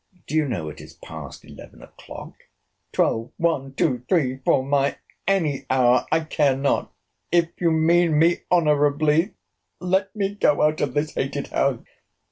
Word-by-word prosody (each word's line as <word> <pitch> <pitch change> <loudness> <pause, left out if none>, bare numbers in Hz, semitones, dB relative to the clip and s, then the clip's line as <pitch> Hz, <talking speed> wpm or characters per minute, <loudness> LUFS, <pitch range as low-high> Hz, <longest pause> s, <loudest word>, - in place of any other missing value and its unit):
—Do - - -9
you 155 -2 +2
know 90 - -3
it 75 - -8
is - - -13
past - - -10
eleven - - -13
o'clock? - - -11 0.6
Twelve, 115 +2 0
one, 140 -5 -1
two, 125 -6 0
three, 135 -8 +1
four—any 140 +4 0
hour, 125 -1 +3
I 160 +1 +3
care 145 -4 +1
not—If 165 +4 -1
you 170 - +3
mean 165 0 +3
me 165 +3 +4
honourably, 150 +1 +2 0.4
let 190 +3 0
me 200 -1 -1
go 150 -8 +2
out 155 0 +1
of 135 -3 -2
this 150 +1 -1
hated 140 +1 -3
house! 135 -4 0
150 Hz, 140 wpm, -23 LUFS, 135-170 Hz, 0.6 s, me